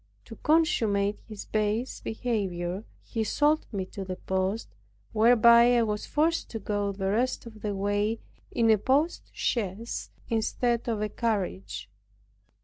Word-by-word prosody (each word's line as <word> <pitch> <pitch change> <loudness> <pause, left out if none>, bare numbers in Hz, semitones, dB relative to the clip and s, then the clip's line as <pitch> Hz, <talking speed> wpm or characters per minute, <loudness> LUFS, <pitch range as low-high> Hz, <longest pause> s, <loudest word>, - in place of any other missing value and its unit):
To - - -10
consummate 225 - +2
his 215 -3 -8
base 215 +3 -1
behavior, 195 -5 -2 0.2
he 225 - -2
sold 295 +7 +2
me 195 -4 -2
to 195 - -4
the 185 -1 -4
post, 190 +4 -2 0.4
whereby 235 +2 +6
I 235 - +4
was 210 -1 -2
forced 325 +3 +1
to 225 - -4
go 205 0 -1
the 195 0 -2
rest 245 +5 0
of 220 -2 -11
the 205 -1 -2
way 205 +3 0 0.3
in 225 -1 +3
a 215 - +4
post 285 - +1
chaise 220 0 -2 0.2
instead 235 +1 0
of 215 -2 -1
a 210 - -1
carriage. 185 - -2
220 Hz, 140 wpm, -28 LUFS, 200-235 Hz, 0.4 s, whereby